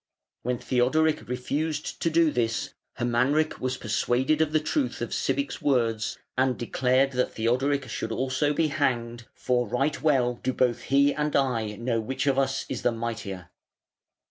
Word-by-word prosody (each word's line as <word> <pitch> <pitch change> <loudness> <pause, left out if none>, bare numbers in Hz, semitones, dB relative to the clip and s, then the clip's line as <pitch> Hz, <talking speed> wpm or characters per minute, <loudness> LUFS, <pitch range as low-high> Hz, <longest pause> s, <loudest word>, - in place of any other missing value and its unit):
When 125 +1 -1
Theodoric 135 +5 +1
refused 145 +5 -3
to 165 - +2
do 165 -1 +3
this 115 -3 -1 0.2
Hermanric 125 +6 +1
was 130 0 -1
persuaded 125 +7 +1
of 155 -1 +2
the 155 - +3
truth 250 - -1
of - - -4
Sibich's 280 0 -1
words, 115 -6 +1 0.2
and 130 -2 +1
declared 130 +3 +1
that 125 -1 -1
Theodoric 130 +5 +1 0.3
also 130 +5 0
should 145 - +1
be 160 0 +2
hanged, 120 -5 -1
"for 125 -2 0
right 135 +8 -1
well 125 -6 +2
do 130 - -1
both 125 -2 +1
he 140 +1 +4
and 150 0 -1
I 115 -6 +1
know 115 +1 -1
which 130 +6 -3
of 135 -1 +2
us 135 0 0
is 130 - -4
the 120 - +2
mightier". 105 -6 -5
130 Hz, 160 wpm, -26 LUFS, 120-145 Hz, 0.3 s, he